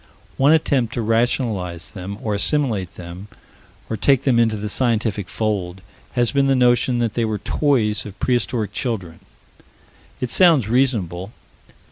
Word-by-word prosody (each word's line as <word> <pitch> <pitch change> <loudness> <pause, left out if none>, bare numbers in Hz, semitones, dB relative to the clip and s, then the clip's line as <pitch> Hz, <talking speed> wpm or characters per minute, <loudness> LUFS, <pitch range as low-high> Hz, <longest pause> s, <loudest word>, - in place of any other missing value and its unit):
One 140 +3 +4
attempt 140 -7 +2
to 120 - -1
rationalize 110 -6 -1
them, 100 0 -7
or 110 - -1
assimilate 105 - 0
them, 90 +3 -9 0.6
or 110 - -3
take 135 +5 +2
them 125 -4 +3
into 110 -2 +2
the 105 +1 -4
scientific 110 -4 -1
fold, 95 -4 -2 0.3
has 120 -2 +1
been 140 -1 +2
the 135 - +3
notion 125 0 +3
that 115 -2 0
they 115 - 0
were 110 -1 -1
toys 115 -5 0
of 105 -1 -11
prehistoric 120 -4 -1
children. 95 -9 -4 1.0
It 125 - -3
sounds 165 - +4
reasonable. 110 -6 0
115 Hz, 145 wpm, -21 LUFS, 100-125 Hz, 1.0 s, One